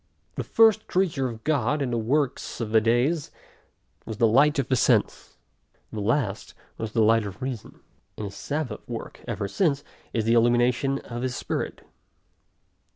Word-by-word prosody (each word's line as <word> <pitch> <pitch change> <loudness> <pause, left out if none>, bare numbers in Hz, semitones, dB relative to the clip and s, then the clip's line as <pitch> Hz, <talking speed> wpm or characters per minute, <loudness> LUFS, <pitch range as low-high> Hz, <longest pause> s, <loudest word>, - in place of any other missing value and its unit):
The - - -3
first 220 -1 +4
creature 160 -9 0
of 110 -2 -9
God, 145 -1 +1
in 135 -3 -1
the 120 - 0
works 135 +4 -1
of 115 -3 -3
the 110 0 +5
days, 125 +8 +1 0.7
was 110 - -6
the 115 - +4
light 140 +7 +4
of 135 -3 0
the 130 - +2
sense; 115 - +1 0.5
the 105 - -4
last, 110 -1 -1 0.2
was 110 -1 -4
the 115 - +3
light 115 +1 +4
of 100 +1 -7
reason; 130 -4 -6 0.4
and - - -5
his 100 0 -7
sabbath 145 -7 -3
work - - -7
ever 100 - -2
since, 145 - +1 0.3
is 115 - 0
the 115 - +3
illumination 120 +3 +3
of 120 0 -6
his 130 -1 -2
Spirit. - - -4
120 Hz, 165 wpm, -25 LUFS, 115-140 Hz, 0.7 s, the